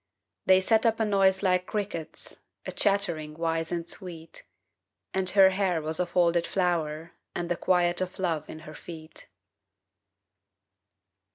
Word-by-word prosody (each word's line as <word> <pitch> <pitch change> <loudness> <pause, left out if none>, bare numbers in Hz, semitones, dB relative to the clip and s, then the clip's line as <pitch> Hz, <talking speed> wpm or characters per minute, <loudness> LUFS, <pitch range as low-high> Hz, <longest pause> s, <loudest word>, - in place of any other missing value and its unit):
They 190 0 +6
set 220 +3 +3
up 225 0 +1
a 220 - +2
noise 195 -2 +2
like 180 -1 +2
crickets, 195 -7 -5 0.3
A - - -4
chattering 170 -7 0
wise 165 0 -1
and 170 -1 -3
sweet. 165 -3 -8 0.7
And 190 -1 +3
her 190 0 +6
hair 185 -3 0
was 160 +1 -2
a 180 - 0
folded 170 -1 +2
flower 165 -3 -1 0.2
And 175 0 -3
the - - +2
quiet 175 0 +1
of 185 0 -4
love 170 -5 -2
in 155 - -9
her 155 0 -11
feet. 160 0 -11
175 Hz, 145 wpm, -27 LUFS, 165-190 Hz, 0.7 s, They